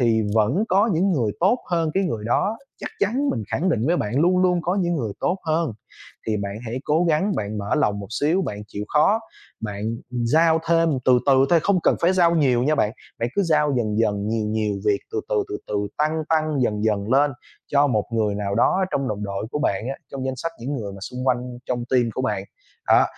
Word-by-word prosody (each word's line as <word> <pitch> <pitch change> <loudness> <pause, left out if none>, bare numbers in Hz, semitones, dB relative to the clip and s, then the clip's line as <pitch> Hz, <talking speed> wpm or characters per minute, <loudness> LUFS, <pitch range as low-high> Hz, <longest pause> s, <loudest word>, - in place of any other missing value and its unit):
thì 115 -2 +3
vẫn 115 - +2
có 200 +5 +3
những 185 +4 +2
người 115 -9 0
tốt 195 +8 +3
hơn 165 -2 +1
cái 195 - +2
người 115 - -3
đó, 200 - 0 0.2
chắc - - -6
chắn 250 +8 +1
mình 115 - -2
khẳng 185 +6 0
định 120 -6 +1
với 175 +2 +2
bạn 110 +6 -1
luôn 180 +2 +3
luôn 180 -2 +2
có 180 - 0
những 175 -1 0
người 110 -7 -2
tốt 185 - 0
hơn, 160 -4 +1 0.5
thì 110 -1 0
bạn 100 -1 -3
hãy 120 +3 -4
cố 160 +4 +2
gắng 175 +5 +2
bạn 105 0 -3
mở 100 +6 -1
lòng 105 -9 +1
một 100 - -7
xíu, 165 +6 +2
bạn 105 -9 -4
chịu 105 +1 -5
khó, 180 +9 +3 0.4
bạn 105 -2 -5 0.3
giao 155 +7 +3
thêm 165 0 +4 0.2
từ 125 -1 +5
từ 135 -1 +5
thôi, 170 -2 +5
không 195 -3 +2
cần - - +3
phải 175 +2 +3
giao 170 -2 +4
nhiều 130 -6 +3
nha 155 +3 +2
bạn. 105 -6 +1 0.3
Bạn 115 - -1
cứ 200 - +2
giao 150 -4 +2
dần 110 -3 0
dần 105 -2 0
nhiều 110 -1 -1
nhiều 105 -1 -1
việc 100 -1 +3
từ 425 - -1
từ, 450 -5 +1
từ 405 - -4
từ 105 -1 -1
tăng, 155 +1 +1
tăng 155 -3 +1
dần 105 -2 0
dần 105 -1 0
lên 145 +1 +4 0.3
cho 145 0 +3
một 110 -6 +1
người 105 -3 +1
nào 100 -1 -2
đó 185 - +3
trong 135 -2 -1
đồng 105 -1 -3
đội 100 +2 -4
của 150 - -2
bạn 105 -7 0
á, 135 - -2 0.2
trong 135 -1 -4
danh 130 -1 -3
sách 165 +6 -4
những 140 +4 -3
người 105 -5 -5
mà 100 - -10
xung 125 +6 -6
quanh 125 -2 +3 0.3
trong 120 -1 -2
team 125 -1 +4
của 130 - -2
bạn. 105 -6 -1 0.4
Đó, - - +6
135 Hz, 235 wpm, -23 LUFS, 110-170 Hz, 0.5 s, Đó